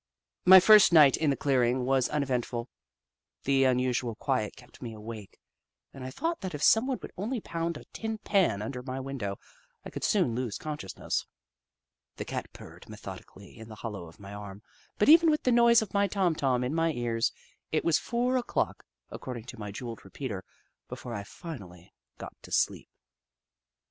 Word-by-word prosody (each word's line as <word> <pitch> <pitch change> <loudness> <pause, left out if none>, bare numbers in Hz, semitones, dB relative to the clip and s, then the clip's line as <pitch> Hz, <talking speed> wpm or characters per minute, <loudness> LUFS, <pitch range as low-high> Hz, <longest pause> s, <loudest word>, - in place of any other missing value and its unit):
My 190 +1 +11
first 210 +1 +7
night 150 -5 +7
in 155 - +1
the 140 - +2
clearing 125 -2 +1
was 130 -1 +2
unevent 135 -5 0
ful. 120 0 -4 0.8
The 135 -1 +3
unusual 125 -2 +1
quiet 125 -4 -1
kept 125 - -17
me 115 -3 -6
awake, 105 -2 -9 0.6
and 135 - -9
I 130 - -5
thought 330 - -3
that 185 -5 -4
if 150 - -5
someone 255 +3 +4
would - - -7
only 230 +7 -2
pound 170 -4 -3
a - - -11
tin 220 0 -4
pan 190 - +1
under 125 +3 -5
my 130 +1 -5
window, 130 -8 -4 0.5
I - - -7
could - - -6
soon 115 - +2
lose 120 -3 -3
consciousness. 150 -11 -4 0.9
The - - -5
Cat - - -5
purred - - -13
methodically - - -10
in 110 0 -11
the 110 - -9
hollow 100 -6 -5
of 80 - -16
my 100 0 -10
arm, 100 0 -9 0.3
but 210 - +2
even 325 +2 +8
with 305 -1 +1
the 255 - +3
noise 235 -1 +6
of 215 - -10
my 200 0 +3
Tom 190 -4 +1
Tom 130 -5 0
in 125 +4 -2
my 165 0 +2
ears, 120 -2 0 0.4
it 155 - 0
was 165 -2 +4
four 245 +2 0
o'clock, 245 - -1 0.3
according 125 -3 -6
to 115 - -10
my 105 -1 -5
jewelled 115 +2 -7
repeater, 100 -1 -6 0.4
before 120 - -7
I 100 - -3
finally 100 - -10 0.2
got - - -8
to - - -14
sleep. - - 0
130 Hz, 180 wpm, -29 LUFS, 115-180 Hz, 0.9 s, My